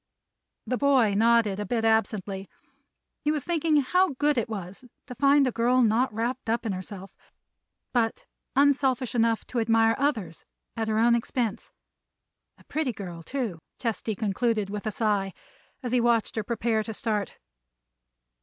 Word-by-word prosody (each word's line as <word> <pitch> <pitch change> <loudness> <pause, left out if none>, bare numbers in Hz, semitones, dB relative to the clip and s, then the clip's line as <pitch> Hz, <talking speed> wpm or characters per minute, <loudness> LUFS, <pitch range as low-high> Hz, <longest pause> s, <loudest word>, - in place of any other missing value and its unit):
The 250 - -2
boy 265 -7 +4
nodded, 220 -1 +3
a 210 - -2
bit 230 0 0
absently. 205 -3 0 0.7
He 300 - +2
was 300 -3 -1
thinking 325 -3 +1
how 360 +2 +2
good 295 +1 +2
it 235 -2 -1
was 195 0 -7 0.2
to 250 - -8
find 280 +2 +4
a 255 - +1
girl 245 +2 +3
not 230 +3 +2
wrapped 235 +3 -3
up 230 +1 0
in 220 - 0
herself, 190 +1 -7 0.8
but 230 -2 0 0.3
unselfish 270 -3 +2
enough 230 -2 +1
to 245 - -3
admire 225 0 +3
others 220 - -1 0.3
at 225 -1 -2
her 215 0 0
own 235 +2 +4
expense. 235 -2 -2 0.9
A - - -20
pretty 300 -3 -2
girl, 180 -5 -7
too, 220 - -4 0.2
Chesty 225 -2 -2
concluded 215 0 -1
with 210 +1 -4
a - - 0
sigh, 200 -3 0 0.5
as 245 - -3
he 250 -1 +3
watched 235 -2 +1
her 220 - -1
prepare 230 0 0
to 220 0 -6
start. 210 -3 -2
230 Hz, 155 wpm, -26 LUFS, 210-255 Hz, 0.9 s, boy